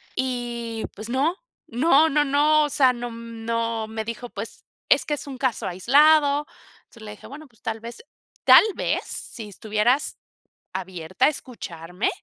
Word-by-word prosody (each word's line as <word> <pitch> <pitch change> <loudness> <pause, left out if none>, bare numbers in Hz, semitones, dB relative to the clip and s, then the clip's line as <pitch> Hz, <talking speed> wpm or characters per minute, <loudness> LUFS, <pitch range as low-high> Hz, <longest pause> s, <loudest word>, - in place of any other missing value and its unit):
Y, 240 -3 -3
pues, 215 +2 -8
no, 280 +8 +1 0.3
no, 300 +5 +4
no, 295 0 +2
no, 300 +2 +4
o - - -3
sea, 265 -2 +4
no, 240 0 -6
mm, 230 -1 -9
no, 230 -1 -1
me 220 0 -4
dijo: 230 +2 -6
"Pues, 205 +1 -8 0.2
es - - +4
que 300 - -2
es - - -8
un 270 -2 -7
caso 255 -2 -1
aislado," 285 - +4 0.4
entonces, 230 - -16
le 210 - -8
dije: 210 - -12
"Bueno, 300 +3 -11
pues, 230 -5 -29
tal 225 0 -3
vez 235 0 -9 0.4
tal - - +9
vez, - - -1
si 225 -3 -6
estuvieras 215 +6 0 0.6
abierta 185 +3 -2
a - - +5
escucharme, 180 - -5
235 Hz, 165 wpm, -24 LUFS, 220-280 Hz, 0.6 s, tal